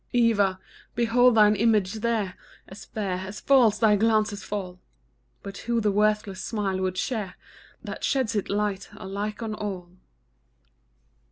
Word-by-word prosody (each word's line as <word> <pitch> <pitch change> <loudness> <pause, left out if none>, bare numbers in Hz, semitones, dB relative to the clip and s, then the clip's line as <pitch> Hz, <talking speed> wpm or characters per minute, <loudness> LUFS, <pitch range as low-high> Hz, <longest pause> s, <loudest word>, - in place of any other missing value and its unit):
Eva! 205 -6 +2 0.4
behold 240 +1 +4
thine 210 -1 +6
image 210 -3 +2
there, 215 -4 -1 0.3
As 190 - -11
fair, 195 -4 -3
as 190 +2 -7
false 245 -6 +4
thy 215 -2 +4
glances 215 -1 +1
fall; 185 -3 -5 0.6
But 200 0 -8
who 235 -1 +2
the 210 -2 +1
worthless 210 -1 0
smile 200 -4 -2
would 185 0 -2
share 210 -7 -3 0.5
That - - -7
sheds 260 -5 0
its 205 - -2
light 205 -1 -2
alike 205 +3 -5
on 220 -1 -3
all. 190 -5 -5
210 Hz, 140 wpm, -25 LUFS, 195-225 Hz, 0.6 s, thine